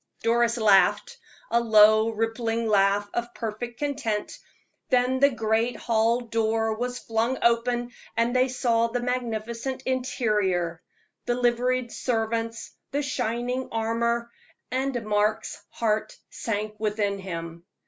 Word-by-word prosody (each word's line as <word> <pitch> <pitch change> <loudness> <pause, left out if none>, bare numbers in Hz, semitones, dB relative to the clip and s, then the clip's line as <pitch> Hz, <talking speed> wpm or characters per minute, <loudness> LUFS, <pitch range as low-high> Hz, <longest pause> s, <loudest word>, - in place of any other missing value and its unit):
Doris 235 +1 +2
laughed, 205 -4 +3 0.3
a 235 - +4
low, 220 -1 +6
rippling 225 +1 -1
laugh 200 0 +3
of 240 0 -3
perfect 235 +1 -5
content; 275 -8 -2 0.5
then 255 0 +2
the 280 +1 +6
great 225 -1 0
hall 230 +1 +1
door 225 -1 0
was 245 +3 -3
flung 230 +3 -1
open, 240 +1 +1 0.3
and 235 +2 +1
they 255 +1 +4
saw 235 -2 +1
the 240 +2 -2
magnificent 240 +1 -3
interior, 210 -10 0 0.5
the 240 - +1
liveried 245 0 +1
servants, 230 -1 -2 0.2
the 285 +1 -1
shining 250 0 -2
armor, 235 +1 -1 0.4
and 260 -3 -1
Mark's 210 0 0
heart 215 -2 -1
sank 215 -1 -3
within 210 -2 -1
him. 170 -3 -6
230 Hz, 115 wpm, -26 LUFS, 215-245 Hz, 0.5 s, low